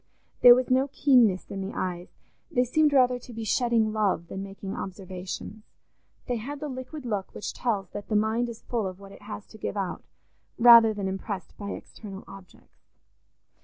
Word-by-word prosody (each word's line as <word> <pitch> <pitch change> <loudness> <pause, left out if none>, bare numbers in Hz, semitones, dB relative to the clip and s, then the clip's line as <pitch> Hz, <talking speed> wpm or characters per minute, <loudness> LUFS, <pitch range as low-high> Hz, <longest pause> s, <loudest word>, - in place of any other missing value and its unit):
There 245 -1 +10
was 255 0 -1
no 260 +2 +3
keenness 245 -10 +3
in 195 - -4
the 190 +1 -5
eyes; 180 -1 -3 0.4
they 250 - +2
seemed 300 +5 +2
rather 250 -2 +4
to 245 - -12
be 225 0 -5
shedding 225 -1 +1
love 195 -6 0
than 195 - -5
making 195 0 -7
observations; 190 +2 -7 0.6
they 245 - -1
had 280 +6 -6
the 300 0 -4
liquid 260 +2 -7
look 205 -5 -3
which - - -5
tells 205 -7 -2
that 205 - -7
the 215 - -1
mind 220 +3 +1
is 230 -1 -10
full 230 -5 -2
of 185 0 -8
what 195 0 -12
it - - -14
has 205 0 -8
to 220 - -14
give 205 - -4
out, 195 -2 -3 0.5
rather 230 -1 +8
than 205 -2 -3
impressed 190 0 -5
by 200 -1 -7
external 195 -3 -10
objects. 195 -1 -15
215 Hz, 185 wpm, -27 LUFS, 195-245 Hz, 0.6 s, There